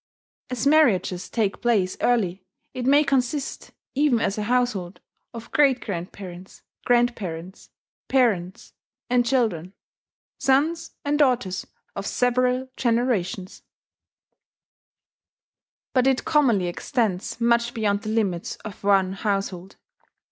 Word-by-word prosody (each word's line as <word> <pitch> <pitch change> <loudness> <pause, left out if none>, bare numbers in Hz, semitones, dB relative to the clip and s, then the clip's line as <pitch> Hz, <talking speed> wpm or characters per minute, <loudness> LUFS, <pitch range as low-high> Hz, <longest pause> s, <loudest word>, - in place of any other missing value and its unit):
As 250 0 -3
marriages 240 - +3
take 210 -4 -1
place 205 -6 +1
early, 195 -6 +1 0.3
it 255 -1 -3
may 285 +2 +6
consist, 275 0 -1 0.2
even 275 -4 +2
as 200 - 0
a 215 - -3
household, 230 -8 0 0.3
of 230 0 -10
great 275 -4 +4
grandparents, 185 -1 -8 0.2
grandparents, 195 -8 -1 0.4
parents, 205 -9 0 0.4
and 250 -1 +4
children 220 -9 0 0.7
sons 320 +5 +1
and 295 +1 +1
daughters 245 -10 +1 0.3
of 200 - -4
several 250 +1 +1
generations; 230 -7 -1 2.3
but 255 0 +3
it 265 -1 +1
commonly 245 - +3
extends 190 +3 -2
much 235 0 +2
beyond 205 -2 0
the 215 - -5
limits 200 -6 -1
of 210 -2 -9
one 195 -2 +3
household. 195 -2 -3
230 Hz, 105 wpm, -24 LUFS, 190-255 Hz, 2.3 s, may